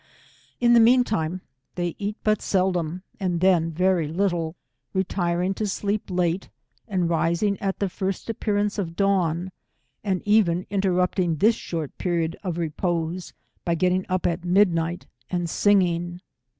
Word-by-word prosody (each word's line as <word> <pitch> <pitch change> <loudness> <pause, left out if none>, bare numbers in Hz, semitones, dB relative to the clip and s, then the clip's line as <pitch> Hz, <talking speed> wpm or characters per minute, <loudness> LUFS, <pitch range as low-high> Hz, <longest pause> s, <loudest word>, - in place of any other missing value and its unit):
In 240 -1 +5
the 235 - +7
mean 245 +2 +6
time, 180 -5 -2 0.3
they 175 -2 -1
eat 205 +1 -3
but 215 -1 +2
seldom, 180 -2 0 0.2
and 180 -3 0
then 175 -3 +3
very 180 -1 +2
little, 170 -1 -1 0.4
retiring 180 -1 0
to 210 +2 -2
sleep 205 +1 -2
late, 180 0 0 0.4
and 185 -5 0
rising 170 +4 +1
at 195 -1 -2
the 200 - 0
first 190 +1 -3
appear 215 -2 -1
ance 205 +1 0
of 165 -4 -3
dawn, 185 -3 +1 0.5
and 190 -3 -1
even 190 -4 +3
interrupting 185 -3 +1
this 215 +9 +4
short 165 -8 -5
period 170 -2 0
of 180 -4 -3
repose, 170 +1 -2 0.3
by 170 -1 +1
getting 185 +2 +1
up 185 0 0
at 170 0 0
midnight 175 -2 +2 0.2
and 175 -1 -1
singing. 175 -3 +2
180 Hz, 145 wpm, -24 LUFS, 170-200 Hz, 0.5 s, the